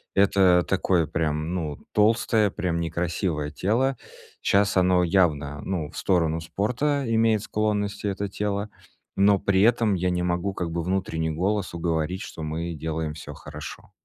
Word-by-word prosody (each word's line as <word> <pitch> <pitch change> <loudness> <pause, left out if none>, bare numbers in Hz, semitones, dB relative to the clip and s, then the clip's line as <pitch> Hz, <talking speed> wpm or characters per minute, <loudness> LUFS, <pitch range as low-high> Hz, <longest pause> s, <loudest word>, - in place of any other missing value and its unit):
это 95 -3 +5
такое 90 -3 +2
прям, 80 +1 -1
ну, 75 -5 -3 0.2
толстое, 110 0 +3
прям 85 -2 -2
некрасивое 85 -2 -2
тело. 120 - +1 0.5
Щас 100 0 +2
оно 90 -1 +4
явно, 75 -6 +1
ну, 80 -6 -3
в - - -11
сторону 80 -3 +1
спорта 125 - -1
имеет 110 -2 +2
склонности, 105 -1 -1
это 100 0 -2
тело, 105 +1 -2 0.5
но 100 +1 +5
при 95 0 +2
этом 110 -1 +4
я 90 +1 0
не 90 0 -1
могу 90 +2 -1
как 85 -2 -3
бы 85 0 -2
внутренний 90 -3 -1
голос 95 +3 -1
уговорить, 85 +2 -1
что 80 - -8
мы 85 +2 -3
делаем 80 0 -3
всё - - -8
хорошо. - - -9
90 Hz, 150 wpm, -25 LUFS, 80-100 Hz, 0.5 s, это